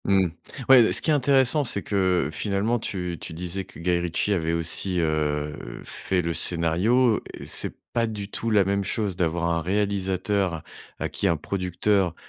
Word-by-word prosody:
Mmh. 95 -2 +3 0.4
Ouais, 130 -2 +8
beh, 110 - +3
ce - - +4
qui 160 - +2
est - - +4
intéressant 140 +1 +3
c'est 100 -6 +2
que 95 -7 +1
finalement 105 +4 0
tu 90 -5 -4
tu - - -6
disais 90 +3 -4
que - - -15
Guy 85 +1 0
Ritchie 85 +4 0
avait 85 -3 -1
aussi, 85 +2 0
heu, 75 -2 -1
heu, - - -9
fait 90 -2 -2
le 85 0 -1
scénario 90 - +2
et - - -9
c'est - - +2 0.2
pas 115 -1 +1
du 105 -3 -5
tout 115 - -3
la 105 -3 +4
même 100 +1 0
chose 100 0 -2
d'avoir 85 -1 0
un 85 0 0
réalisateur 95 -2 -1 0.3
à - - -2
qui - - -2
un 85 - +2
producteur 90 +1 0
95 Hz, 185 wpm, -24 LUFS, 85-105 Hz, 0.4 s, Ouais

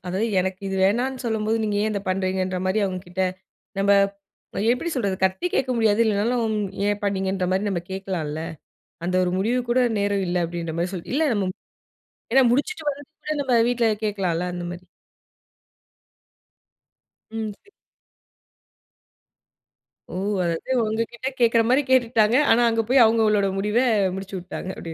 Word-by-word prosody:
அதாவது, 190 +5 -1
எனக்கு 190 +1 -3
இது 195 - -2
வேணான்னு 250 +6 0
சொல்லும்போது, 220 -1 0
நீங்க 205 -1 -1
ஏன் 215 - 0
இதை 200 - -2
பண்ணுறீங்க"ன்ற? 185 0 -1
மாதிரி 200 +3 +1
அவங்க 185 -1 -2
கிட்ட 180 +2 -4 0.6
நம்ம 200 +1 +3 0.8
எப்படி 335 +7 -3
சொல்றது? 200 -6 -1
சத்தமா 190 - +1
கேக்க 260 -1 +1
முடியாது, 220 -1 +3
இல்லனாலும் 220 +1 +1 0.3
ஏன் 205 0 -1
பண்ணீங்கன்ற? 190 -2 -1
மாதிரி 205 +2 0
நம்ம 175 -3 -2
கேட்கலால்ல. 175 -6 -3 0.7
அந்த 185 - -1
ஒரு 180 - -1
முடிவுக்கு 240 +4 0
கூட 255 +1 +3 0.2
நேரம் 200 -1 0
இல்ல 180 - -1
அப்படின்ற 170 -1 -5
மாதிரி 175 +3 -1
சொல்ல 175 - -7
இல்ல 310 - +2
நம்ம 195 -3 0 0.8
ஏன்னா 265 +1 +6
முடிச்சிட்டு 300 - -1
வர்றதுகுள்ள, 290 +2 -7
நம்ம 265 -2 0 0.2
வீட்டில் 225 -3 +1
கேட்கலாம்ல 180 -4 -1
அந்த 175 0 -5
மாரி. 180 +1 -9 2.5
ம் 215 -1 -3
செரி. 405 - -24 2.4
ஓ! - - -8 0.3
அதாவது 170 +9 -2
ஒங்ககிட்ட 230 +3 -2
கேட்கிற 230 -1 +4
மாரி 265 +3 +4
கேட்டுட்டாங்க. 230 -3 +3 0.2
ஆனா 240 - +5
அங்கே 225 0 +1
போய் 260 -2 +7
அவங்களோட 215 -3 +3
முடிவ 210 +3 0 0.4
முடிச்சு 195 0 -7
விட்டாங்க. 185 +1 -7
அப்டி. 165 -1 -7
205 Hz, 140 wpm, -23 LUFS, 185-235 Hz, 2.5 s, போய்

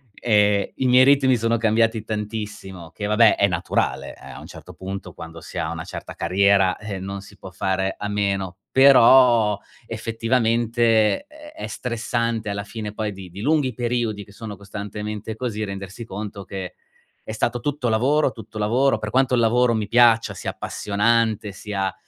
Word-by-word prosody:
ehm, 105 -3 +2
i 130 - -2
miei 125 +1 +6
ritmi 135 -2 +4
sono 115 +1 +1
cambiati 115 0 +1
tantissimo, 105 -5 -6
che 105 +5 -6
vabbè 105 +2 +4
è 100 - +4
naturale 90 -1 -2
a - - -11
un - - -11
certo - - -12
punto, 95 -1 -7
quando 80 0 -10
si - - -10
ha - - -2
una - - -6
certa - - -8
carriera, 95 +1 +2
eh, 105 -3 -6
non 100 +1 -6
si 100 +1 -15
può 95 - -10
fare 95 +1 -1
a 105 - -4
meno. 100 -3 -2
Però 125 -5 +6 0.3
effettivamente, 115 - +1
ehm, 300 0 -14
è 320 - -6
stressante, 115 -2 -2
alla 100 0 -4
fine 105 0 -6
poi 105 -1 -3
di 95 -2 -10
di 90 +3 -11
lunghi 145 0 +1
periodi 115 -3 -2
che 100 - -17
sono 105 -1 -8
costantemente 105 +1 -6
così 110 -3 -3
rendersi 100 +2 -7
conto 105 -1 -7
che, 95 -1 -7 0.5
è - - -2
stato 120 +2 -1
tutto 140 -1 -2
lavoro, 135 +6 +2
tutto 110 -1 -11
lavoro, 120 +6 +2
per 105 0 -5
quanto 130 0 +2
il - - +2
lavoro 120 +1 +3
mi 110 -2 -2
piaccia, 115 0 +4
sia - - -5
appassionante, 110 0 0
sia 95 -1 -3
110 Hz, 170 wpm, -22 LUFS, 100-120 Hz, 0.5 s, miei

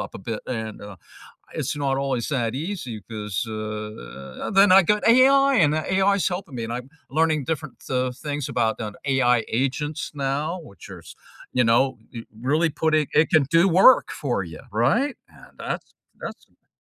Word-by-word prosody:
up - - -6
a - - -6
bit, 110 +3 -5
and, 110 -3 -5
uh, 100 -2 -9 0.6
it's - - -3
not 135 -2 0
always 135 -4 -1
that 120 -5 -1
easy 145 - -5
'cause, 105 -2 -3
uh, 105 - -6
then 195 0 +6
I 195 +1 +8
got 210 +5 +1
AI 275 +3 +6
and 155 -6 +4
that 155 +3 -2
AI's 195 -1 +2
helping 180 -6 -6
me, 115 - -4
and 115 - -5
I'm 125 +2 -5 0.2
learning 155 -1 +1
different, 155 -4 -5
uh, 130 -1 0
things 145 +1 -5
about 120 -4 0 0.3
AI 125 -4 +3
agents 145 +6 -2
now, 145 +5 -2
which 100 - -14
are, 90 -3 -10 0.5
you 125 -1 +2
know, 120 +2 +2 0.4
really 155 +6 +1
putting 155 0 +1
it 155 +2 +4
can 155 -3 +4
do 165 +3 +5
work 195 +9 +6
for 120 -9 -2
you, 80 -3 -10
right, 235 - +1
and - - -19
that's - - -5 0.3
that's - - -8
som - - -39
140 Hz, 170 wpm, -23 LUFS, 115-165 Hz, 0.6 s, I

